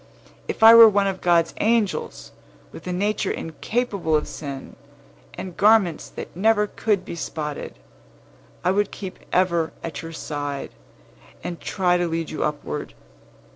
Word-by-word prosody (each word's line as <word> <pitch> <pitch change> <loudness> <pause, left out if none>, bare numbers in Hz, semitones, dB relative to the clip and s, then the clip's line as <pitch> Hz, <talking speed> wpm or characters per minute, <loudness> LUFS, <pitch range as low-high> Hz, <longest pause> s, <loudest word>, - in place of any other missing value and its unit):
"If - - -3
I 225 +1 +11
were 230 -1 +10
one 200 -1 +2
of 190 -1 -2
God's 170 -2 +3
angels, 220 -2 0 0.4
with - - -11
a - - -2
nature 200 +2 0
incapable 195 0 -2
of 150 - 0
stain, 140 -3 -7 0.6
and 185 -2 -7
garments 205 -6 +3
that - - -9
never 210 +3 +3
could 210 -2 -1
be - - -6
spotted, 150 -3 -5 0.9
I 180 - +3
would 205 +1 +1
keep 190 -3 -8
ever 170 -3 +1
at 165 - -5
your 165 - -8
side, 145 -3 -5 0.7
and 175 - -5
try 180 -2 +1
to 175 0 0
lead 165 -1 -3
you 155 - -2
upward. 150 0 -4
180 Hz, 145 wpm, -23 LUFS, 160-205 Hz, 0.9 s, I